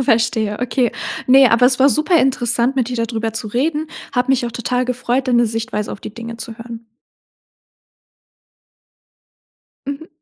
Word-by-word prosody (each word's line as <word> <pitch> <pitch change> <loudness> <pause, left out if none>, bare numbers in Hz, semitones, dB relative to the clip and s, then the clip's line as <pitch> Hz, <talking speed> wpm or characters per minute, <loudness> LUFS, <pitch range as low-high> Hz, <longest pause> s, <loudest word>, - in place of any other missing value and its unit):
Verstehe, 225 -4 +1
okay. 250 -1 0 0.3
Ne, 265 0 +7
aber 240 +2 +5
es 255 0 +2
war 270 +1 +6
super 310 +4 +3
interessant, 245 0 +1
mit 255 -3 +1
dir 250 - -4
da 230 - 0
drüber 225 -1 -3
zu 220 - -4
reden. 300 +7 -1 0.3
Habe 250 0 0
mich 255 -2 +2
auch 235 - -6
total 250 +2 -1
gefreut, 250 +1 -1
deine 240 -1 +3
Sichtweise 225 -1 -3
auf - - -9
die 215 - -9
Dinge 230 0 -7
zu 230 -1 -8
hören. 230 -1 -9 3.0
Mhm. 285 +4 -6
245 Hz, 160 wpm, -18 LUFS, 230-260 Hz, 3.0 s, Ne